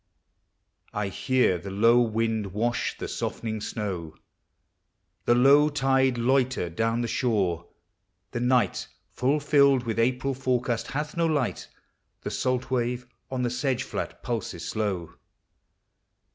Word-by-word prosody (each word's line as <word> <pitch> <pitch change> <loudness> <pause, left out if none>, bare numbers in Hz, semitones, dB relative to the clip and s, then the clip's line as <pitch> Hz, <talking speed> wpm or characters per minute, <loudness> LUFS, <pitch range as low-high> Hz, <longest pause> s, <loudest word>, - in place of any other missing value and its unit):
I 105 -1 -1
hear 125 -3 +1
the 100 +3 -7
low 115 +5 +4
wind 110 -3 -1
wash 120 +3 -1
the - - -5
softening 110 -2 -3
snow, 95 -8 -4 1.1
The 120 - +4
low 140 +4 +6
tide 135 -3 +2
loiter 125 -6 +1
down 115 +6 0
the 120 - -1
shore. 95 -10 0 0.6
The - - -3
night, 125 0 +1 0.2
Full 140 +4 +1
filled 140 -3 +4
with 115 -1 -2
April 130 +3 +1
forecast 125 -3 -1
hath 150 +2 -4
no 170 0 +2
light. 145 -6 -1 0.5
The - - -4
salt 130 0 -1
wave 125 0 -1 0.2
on 130 -1 -2
the 120 - 0
sedge 125 0 0
flat - - -5
pulses 95 -8 -4
slow. 100 -6 -2
120 Hz, 130 wpm, -26 LUFS, 110-130 Hz, 1.1 s, low